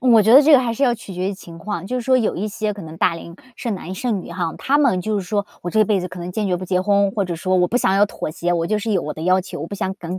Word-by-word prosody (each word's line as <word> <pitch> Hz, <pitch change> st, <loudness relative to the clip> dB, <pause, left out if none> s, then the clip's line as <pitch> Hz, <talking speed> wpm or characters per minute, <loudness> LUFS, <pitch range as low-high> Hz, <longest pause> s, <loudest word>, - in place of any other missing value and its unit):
我 235 Hz, -4 st, +5 dB
觉 220 Hz, -, +4 dB
得 270 Hz, -, +10 dB
这 310 Hz, -, +5 dB
个 270 Hz, -, +8 dB
还 235 Hz, -2 st, -1 dB
是 250 Hz, -, -4 dB
要 245 Hz, -, +3 dB
取 215 Hz, -4 st, -10 dB
决 185 Hz, +2 st, -2 dB
于 -, -, -5 dB
情 170 Hz, -3 st, -12 dB
况。 190 Hz, 0 st, -5 dB
就 250 Hz, -, -2 dB
是 -, -, -4 dB
说 260 Hz, 0 st, +4 dB
有 230 Hz, -, 0 dB
一 205 Hz, -, -2 dB
些 215 Hz, 0 st, -2 dB
可 200 Hz, -, -9 dB
能 160 Hz, 0 st, -9 dB
大 170 Hz, 0 st, +2 dB
龄 170 Hz, 0 st, -9 dB, 0.2 s
剩 230 Hz, -4 st, -3 dB
男 185 Hz, 0 st, -7 dB
剩 225 Hz, -2 st, -1 dB
女 -, -, -10 dB
哈， 170 Hz, -2 st, -3 dB
他 285 Hz, +2 st, +1 dB
们 255 Hz, -11 st, +3 dB
就 215 Hz, +2 st, -1 dB
是 185 Hz, -, -5 dB
说： 205 Hz, +1 st, -1 dB, 0.2 s
“我 175 Hz, -, -3 dB
这 215 Hz, +3 st, +3 dB
辈 200 Hz, -2 st, +1 dB
子 180 Hz, -, -4 dB
可 180 Hz, -, -10 dB
能 175 Hz, +1 st, -5 dB
坚 210 Hz, +3 st, -2 dB
决 180 Hz, -2 st, +1 dB
不 185 Hz, -, -6 dB
结 185 Hz, 0 st, 0 dB
婚”， 200 Hz, 0 st, +2 dB
或 200 Hz, -3 st, 0 dB
者 175 Hz, -2 st, -3 dB
说 185 Hz, +2 st, 0 dB
“我 180 Hz, 0 st, +3 dB
不 240 Hz, -, 0 dB
想 190 Hz, -6 st, +2 dB
要 205 Hz, +1 st, +4 dB
妥 155 Hz, -, -5 dB
协， 175 Hz, +2 st, -2 dB
我 170 Hz, -1 st, 0 dB
就 215 Hz, +2 st, 0 dB
是 215 Hz, +1 st, -2 dB
有 185 Hz, -, +1 dB
我 150 Hz, -, -4 dB
的 155 Hz, -, -7 dB
要 185 Hz, +2 st, +3 dB
求， 180 Hz, -5 st, -8 dB
我 160 Hz, -, -4 dB
不 200 Hz, -, -7 dB
想 190 Hz, -1 st, -2 dB
更- 185 Hz, -1 st, -6 dB
195 Hz, 385 characters per minute, -20 LUFS, 180-215 Hz, 0.2 s, 得